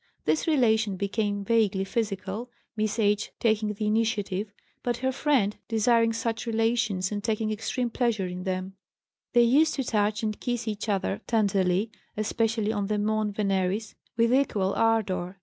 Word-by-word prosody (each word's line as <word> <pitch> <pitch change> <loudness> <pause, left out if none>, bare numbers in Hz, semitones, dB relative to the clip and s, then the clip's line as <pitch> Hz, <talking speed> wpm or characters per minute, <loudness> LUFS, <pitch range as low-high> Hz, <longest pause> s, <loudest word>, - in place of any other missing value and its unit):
This 315 - +1
relation 220 -9 +2
became 205 0 -1
vaguely 210 -3 +2
physical, 205 +2 -3 0.3
Miss 215 0 -1
H. 210 -1 +1
taking 215 -2 +1
the 215 - -3
initiative, 210 -2 0 0.3
but 240 -1 -1
her 260 +1 0
friend 260 -7 +1
desiring 230 +1 +3
such 230 0 -3
relations 225 -4 +1
and 205 -1 -3
taking 220 0 0
extreme 230 +3 -2
pleasure 230 -5 0
in 180 0 -5
them; 185 0 -3 0.6
they 240 -1 +6
used 290 +7 +4
to 270 - -1
touch 210 -2 0
and 215 -1 -2
kiss 240 -2 -2
each 215 0 -3
other 200 +1 -1
tenderly 200 -2 +1 0.3
(especially 220 0 0
on 205 -2 -1
the 210 0 0
mons 210 0 0
veneris), 195 +1 0 0.2
with 230 +1 +3
equal 205 -8 +2
ardor. 195 -5 0
215 Hz, 150 wpm, -27 LUFS, 200-230 Hz, 0.6 s, they